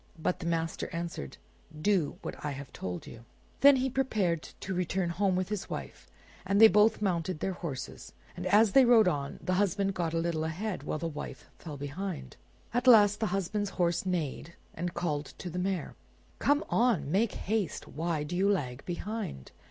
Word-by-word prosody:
But 165 +2 -1
the 170 - -4
master 165 -1 -1
answered, 170 - -5 0.4
"Do 180 -3 +1
what - - -6
I 150 -1 -2
have 135 0 -9
told 90 -2 -5
you." 115 - -11 0.4
Then 280 0 +8
he 260 0 +1
prepared 215 -11 0 0.2
to 190 - -4
return 180 0 -1
home 190 +1 +1
with 185 0 -1
his 210 -2 -4
wife, - - -7 0.3
and 195 +2 +1
they 225 - +11
both 210 +3 +4
mounted 175 -3 -1
their 190 - -1
horses. 140 -7 -6 0.2
And 180 +1 -4
as 210 +2 +5
they 270 - +7
rode 235 -4 +6
on, 145 -5 -1
the 185 - 0
husband 195 0 +1
got 165 -2 -2
a - - +2
little 165 -1 0
ahead, 180 +6 -3
while - - -3
the 165 +2 -3
wife 155 -2 -7
fell 150 -4 -7
behind. 155 +5 -5 0.4
At 245 +2 0
last 210 -4 +7
the 220 - +1
husband's 195 +2 -1
horse 170 -1 +1
neighed, 170 -3 -3 0.2
and 175 0 -4
called 155 -4 -2
to 180 - -6
the 180 - -3
mare— 190 -1 -2 0.5
"Come 290 +2 +2
on! 225 - +2
make 205 +4 +2
haste! 205 -5 -2
Why 160 0 -2
do 155 +4 -4
you 195 +3 +3
lag 135 -10 -1
behind!" 190 - -5
180 Hz, 185 wpm, -30 LUFS, 160-205 Hz, 0.5 s, they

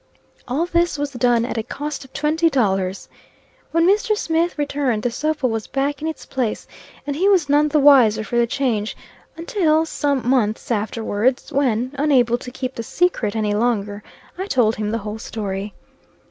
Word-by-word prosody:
All 280 +7 0
this 345 -2 +1
was 290 0 -2
done, 245 -2 +2
at 240 - -3
a - - 0
cost 290 +5 -5
of 265 - -16
twenty 315 +3 +1
dollars. 195 -8 0 0.6
When 330 +1 +2
Mr. 420 +2 +2
Smith 330 -2 0
returned, 280 -6 -1
the 245 - 0
sofa 300 +2 -1
was 225 -3 -1
back 280 +1 -2
in 315 - -2
its 320 - -6
place; 250 -5 -2 0.4
and 285 -1 -3
he 375 +6 +2
was 365 -7 +3
none 295 +1 +4
the 300 0 +2
wiser 250 -7 +6
for 240 - -5
the 235 - +3
change, 230 -5 -1 0.4
until 330 -4 +1
some 280 -6 -1
months 240 -3 +1
afterwards, 220 +2 -1
when, 255 -3 +1
unable 250 -5 +3
to 250 - -8
keep 255 +1 -5
the 230 - -5
secret 235 - 0
any 210 -2 0
longer, 210 -2 -1 0.4
I 380 - -3
told 240 - +2
him 210 -1 -2
the 225 - -1
whole 210 +1 -5
story. 205 -2 -4
260 Hz, 175 wpm, -21 LUFS, 220-300 Hz, 0.6 s, wiser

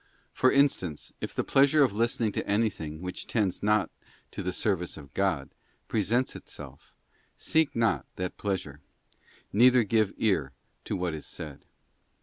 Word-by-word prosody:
For 130 - +4
instance, 130 - +1
if - - -5
the - - 0
pleasure 140 +2 +5
of 125 -7 +2
listening 115 0 +1
to - - -3
anything 95 -7 -1
which 90 0 -5
tends 105 -6 0
not 105 0 +2 0.4
to - - -5
the 90 - -2
service 90 -3 -1
of 70 -4 -12
God 95 -9 0 0.4
presents 115 +4 +1
itself, - - -10 0.5
seek 160 -2 +1
not 100 - +1
that 90 0 -3
plea 100 -2 -1
sure, 75 -4 -10 0.7
neither 125 +3 +6
give 110 -1 +2
ear 85 -11 +1 0.3
to - - -2
what 90 -3 -1
is 75 - -6
said. 75 -3 -8
100 Hz, 150 wpm, -28 LUFS, 85-115 Hz, 0.7 s, neither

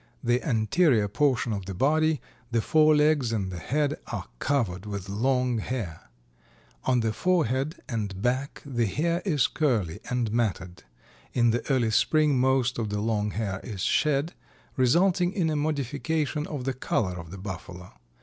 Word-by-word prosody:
The 120 +1 +2
anterior 115 - +2
portion 125 0 +1
of 100 -2 -5
the 95 - -5
body, 155 - +2 0.3
the 120 -1 +1
forelegs 155 -4 +4
and 100 -4 -2
the 90 - -5
head 145 - -1
are - - -4
covered 105 -9 -1
with 100 -2 -5
long 125 +3 +1
hair. 105 - -5 0.8
On 125 -2 +3
the 110 -1 0
forehead 155 -4 +1
and 105 -7 -3
back 130 +6 -1
the 120 -5 0
hair 170 - 0
is 150 - +2
curly 110 - 0
and 125 -3 0
matted. 100 -6 -1 0.5
In 120 -1 +3
the 120 +1 -1
early 120 -4 +2
spring 150 +3 +3
most 130 -1 +2
of 110 -2 -2
the 105 0 -2
long 105 -1 0
hair 100 -3 -3
is 100 -6 -6
shed, 150 - +1 0.4
resulting 175 +8 +3
in 175 -6 +1
a - - 0
modification 150 +1 -1
of 145 -4 -5
the 135 +1 -1
color 110 -6 -1
of 85 -2 -8
the 95 - -8
Buffalo. 90 -1 -8
125 Hz, 160 wpm, -27 LUFS, 105-150 Hz, 0.8 s, forelegs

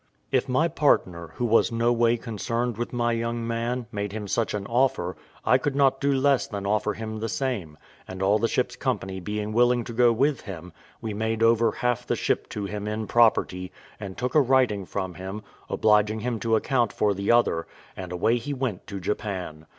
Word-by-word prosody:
If - - +1
my 130 +6 +3
partner, 90 - +1
who 120 - -1
was 115 +1 +3
no 115 +1 +2
way 120 0 +3
concerned 115 +1 -2
with 120 +2 -4
my 120 -1 0
young 115 0 -2
man, 115 +2 -2
made 105 -2 -3
him 105 -2 -5
such 110 +2 0
an 100 -1 -4
offer, 115 -7 +1 0.3
I 130 - +5
could 140 +1 -2
not 135 -1 +3
do 140 0 +2
less 135 0 +2
than 100 -2 -5
offer 105 +1 +1
him 110 -1 -5
the 115 +1 -3
same; 105 - -3 0.3
and 95 +1 -5
all 100 +3 +3
the 115 - +2
ship's - - -1
company 95 0 -2
being 105 +2 -4
willing 120 +1 +3
to 115 - -7
go 120 +1 +5
with 135 +4 +1
him, 90 -3 -9 0.3
we 110 -2 -4
made 110 +1 -1
over 115 0 +4
half 125 +2 -1
the - - +1
ship - - -1
to 105 -1 -4
him 105 +1 -5
in 110 +1 -2
property, 95 -5 +2 0.3
and 100 -3 -7
took 125 +1 -2
a 155 - +6
writing 125 -7 +2
from 95 -2 -3
him, 95 +4 -7 0.3
obliging 105 0 +2
him 120 -1 -2
to 115 +2 +1
account 120 -1 +1
for 105 -1 +1
the 100 +2 0
other, 120 -9 +2 0.3
and 90 -1 -7
away 100 +7 +2
he 140 +5 -4
went 125 -8 -3
to 100 -2 -5
Japan. 90 -5 -4
110 Hz, 205 wpm, -25 LUFS, 100-120 Hz, 0.3 s, a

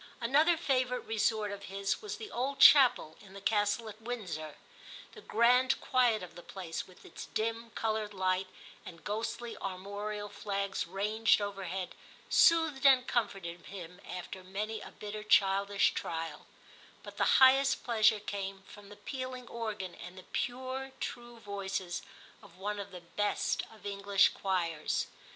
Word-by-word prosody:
Another 300 +8 +4
favourite 255 -5 0
resort 220 -1 0
of 200 0 -7
his 195 0 -2
was 425 -1 -5
the 435 - -8
old 270 +3 -2
chapel 260 - +7
in 195 -1 -15
the 200 - -8
Castle 205 +2 +1
at 215 +1 -10
Windsor: 185 -11 -5 0.6
the 435 - -12
grand 250 - +3
quiet 245 -6 +2
of 175 - -9
the 175 - -10
place, 175 -3 -6
with 185 0 -17
its - - -9
dim, 230 +1 -2
coloured 220 -1 -1
light 185 -1 0 0.4
and 165 -2 -11
ghostly 225 +2 -3
armorial 205 +2 -5
flags 200 -2 -3
ranged 210 +5 +2
over 200 -2 -4
head, 185 +1 -4 0.4
soothed 325 -6 +5
and 265 -2 +6
comforted 195 -8 -2
him 180 -1 -9
after 180 +1 -6
many 210 +4 -4
a - - -9
bitter 210 0 -7
childish 200 -1 +3
trial; 165 -2 -4 0.6
but - - -11
the - - +4
highest 270 +1 +6
pleasure 220 -2 +4
came 195 -1 -5
from 205 0 -14
the 205 - -11
pealing 255 0 -6
organ 215 -6 -4
and 180 +1 -10
the 185 - -10
pure 260 +2 -3
true 240 0 -6
voices 195 -4 -4 0.4
of 195 -4 -17
one 205 +2 -3
of 200 0 -6
the 180 -2 -10
best 205 +4 -1
of 220 -2 -16
English 200 0 +3
choirs. 170 -5 -1
205 Hz, 150 wpm, -32 LUFS, 190-240 Hz, 0.6 s, chapel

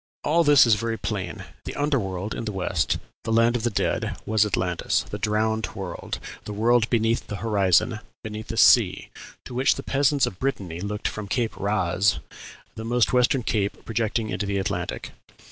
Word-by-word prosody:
All 165 +3 +3
this 145 -4 +7
is 115 - +4
very 115 +2 -1
plain: 95 -7 -4 0.2
the - - -5
under 145 -1 +1
world 95 0 -4
in - - -5
the 110 - -2
West, 90 -4 0 0.3
the - - -3
land 115 +1 +4
of 120 - -1
the 120 - +1
dead, 105 - -1
was 110 0 +3
Atlantis, 90 -3 0
the 105 - -4
drowned 110 +1 0
world, 95 -3 -5 0.3
the 105 - -5
world 115 +2 +3
beneath 115 0 +1
the 105 - -4
horizon, 100 +1 +2 0.2
beneath 110 0 -6
the 115 - -5
sea, 100 -7 +5 0.3
to - - -8
which 130 +2 +3
the 135 - -6
peasants 140 0 +2
of 90 - -7
Brittany 95 -11 -3
looked 105 +1 -3
from 105 -2 -5
Cape 115 +1 -1
Raz, 100 -1 +1 0.6
the 110 - -7
most 120 +2 +1
western 125 +1 +3
cape 100 -3 -2
projecting 110 -1 -1
into 105 - -2
the 100 0 -1
Atlantic. 90 -3 -3
110 Hz, 180 wpm, -25 LUFS, 100-120 Hz, 0.6 s, this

